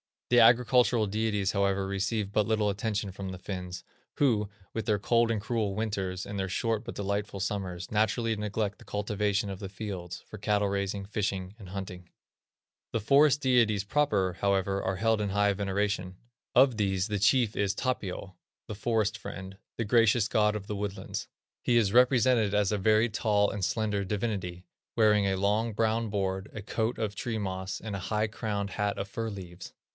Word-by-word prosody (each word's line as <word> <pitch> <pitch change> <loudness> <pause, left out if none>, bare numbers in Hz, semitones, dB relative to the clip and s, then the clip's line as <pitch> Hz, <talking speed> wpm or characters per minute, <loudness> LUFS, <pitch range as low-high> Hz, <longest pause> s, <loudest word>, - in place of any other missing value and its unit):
The 120 - +7
agricultural 120 -1 +5
deities, 105 -1 0
however, 100 -1 +1
receive 100 +1 -1
but 105 -1 +1
little 110 -2 +2
attention 105 0 -2
from 95 0 -6
the 95 - -6
Finns, 90 -1 -6 0.3
who, 110 -8 +2 0.2
with 115 - -3
their 105 -3 +2
cold 115 +3 +2
and 110 -3 0
cruel 110 -3 -1
winters, 95 -4 -2
and 100 -1 -5
their 95 - -1
short 115 +3 -1
but - - -6
delightful 100 0 -2
summers, 95 -3 -3
naturally 110 +2 +1
neglect 105 -1 -2
the - - -15
cultivation 105 0 -1
of 95 -1 -6
the 100 -2 -6
fields, 95 -4 -6
for 110 - -10
cattle 105 -1 +1
raising, 100 0 -2
fishing, 95 -2 -2
and 95 -4 -10
hunting. 90 -2 -7 0.8
The 115 - 0
forest 140 +5 +5
deities 115 -6 +3
proper, 100 -7 +1
however, 100 0 +1
are 95 - -1
held 110 +2 +1
in 105 - -1
high 105 0 +3
veneration. 100 -1 -1 0.4
Of 130 -4 +5
these 95 -1 0
the 105 -1 -1
chief 110 +2 +3
is 100 -1 0
Tapio, 95 -7 -3 0.3
"The - - -5
Forest 110 -1 0
Friend," 95 -2 -8 0.2
"The 115 - -1
Gracious 115 0 +4
God 105 0 +2
of 105 -2 -5
the 105 0 -4
Woodlands." 100 -1 -4 0.3
He 120 - +1
is 105 -4 +2
represented 125 -4 +4
as 105 -1 +2
a 105 - +1
very 110 +3 +3
tall 105 -1 +2
and 100 - -4
slender 105 -1 0
divinity, 95 -4 -3 0.3
wearing 105 -3 +4
a 95 - +1
long, 105 +4 +1
brown 110 +1 0
board, 95 -1 -2
a 110 - -6
coat 110 +3 -1
of 110 -2 -2
tree 115 -2 -3
moss, 95 -2 -3
and 110 -2 -5
a - - -3
high 110 0 +1
crowned 105 -2 -3
hat 105 -1 -1
of 100 0 -4
fir 115 +2 -3
leaves. 90 -3 -9
105 Hz, 180 wpm, -29 LUFS, 95-110 Hz, 0.8 s, The